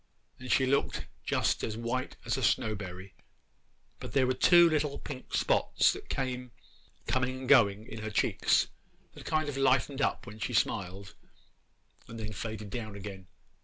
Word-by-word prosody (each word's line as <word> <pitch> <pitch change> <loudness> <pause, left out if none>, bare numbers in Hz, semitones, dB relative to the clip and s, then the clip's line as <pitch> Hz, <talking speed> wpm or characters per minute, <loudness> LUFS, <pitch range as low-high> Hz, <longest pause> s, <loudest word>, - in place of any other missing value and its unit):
And 125 0 -5
she 130 - +4
looked 140 +2 0 0.2
just - - 0
as 110 -1 -3
white 120 +2 -3
as - - 0
a - - -3
snowberry; 95 -3 -1 0.9
but - - -8
there 135 -2 +4
were 130 - +1
two 175 +6 +6
little 150 -3 0
pink 130 -3 -7
spots - - +3
that - - -10
came 125 -1 -3 0.6
coming 130 0 -1
and 130 - -6
going 110 -6 +5
in 110 - -8
her 110 - -4
cheeks, 105 - +2 0.5
that - - -12
kind 155 -1 0
o' 145 - -3
lightened 135 +1 +2
up - - 0
when 105 +2 -10
she 120 - -3
smiled, 95 -3 -1 0.9
and 115 0 -8
then 110 0 -5
faded 110 -1 -6
down 110 -3 -5
again. 95 -2 -8
115 Hz, 165 wpm, -30 LUFS, 105-130 Hz, 0.9 s, two